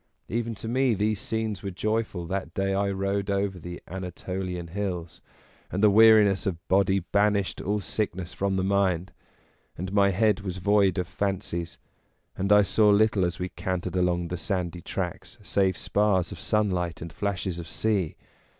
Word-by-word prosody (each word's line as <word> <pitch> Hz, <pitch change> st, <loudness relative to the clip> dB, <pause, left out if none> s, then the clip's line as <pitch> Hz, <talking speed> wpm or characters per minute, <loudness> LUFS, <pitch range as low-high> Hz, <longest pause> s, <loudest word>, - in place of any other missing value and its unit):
Even 115 Hz, 0 st, -2 dB
to 110 Hz, -, -7 dB
me 125 Hz, 0 st, +2 dB
these 105 Hz, +1 st, 0 dB
scenes 110 Hz, -3 st, -2 dB
were 100 Hz, -, -4 dB
joyful 110 Hz, -2 st, -2 dB
that 95 Hz, -1 st, -4 dB
day 95 Hz, 0 st, 0 dB
I 100 Hz, +1 st, +1 dB
rode 100 Hz, +1 st, -1 dB
over 100 Hz, -1 st, -1 dB
the 90 Hz, +1 st, -7 dB
Anatolian 90 Hz, 0 st, -5 dB
hills, 90 Hz, -3 st, -4 dB, 0.5 s
and 95 Hz, +3 st, -2 dB
the 105 Hz, -, +7 dB
weariness 110 Hz, -2 st, +6 dB
of 85 Hz, -3 st, -4 dB
body 95 Hz, 0 st, +3 dB
banished 100 Hz, +1 st, +1 dB
all 105 Hz, +2 st, -1 dB
sickness 95 Hz, -3 st, -3 dB
from 100 Hz, 0 st, -1 dB
the 95 Hz, -, 0 dB
mind, 95 Hz, -3 st, +1 dB, 0.7 s
and 95 Hz, +3 st, -5 dB
my 100 Hz, -1 st, +5 dB
head 105 Hz, +1 st, +2 dB
was 95 Hz, -2 st, -5 dB
void 100 Hz, 0 st, +3 dB
of 90 Hz, -1 st, -1 dB
fancies, 95 Hz, -3 st, -3 dB, 0.6 s
and 100 Hz, +2 st, -1 dB
I 105 Hz, 0 st, +7 dB
saw 105 Hz, +1 st, +3 dB
little 105 Hz, -1 st, +4 dB
as 85 Hz, -1 st, -1 dB
we 90 Hz, 0 st, -3 dB
cantered 90 Hz, 0 st, -3 dB
along 90 Hz, -1 st, +1 dB
the 90 Hz, -, -3 dB
sandy 90 Hz, -1 st, -3 dB
tracks -, -, -5 dB
save 95 Hz, -2 st, +1 dB
spars 100 Hz, -4 st, +1 dB
of -, -, -8 dB
sunlight 90 Hz, -7 st, 0 dB
and 85 Hz, -1 st, -8 dB
flashes 95 Hz, -3 st, -2 dB
of 85 Hz, -, -7 dB
sea. 100 Hz, -4 st, 0 dB
95 Hz, 170 wpm, -26 LUFS, 90-105 Hz, 0.7 s, the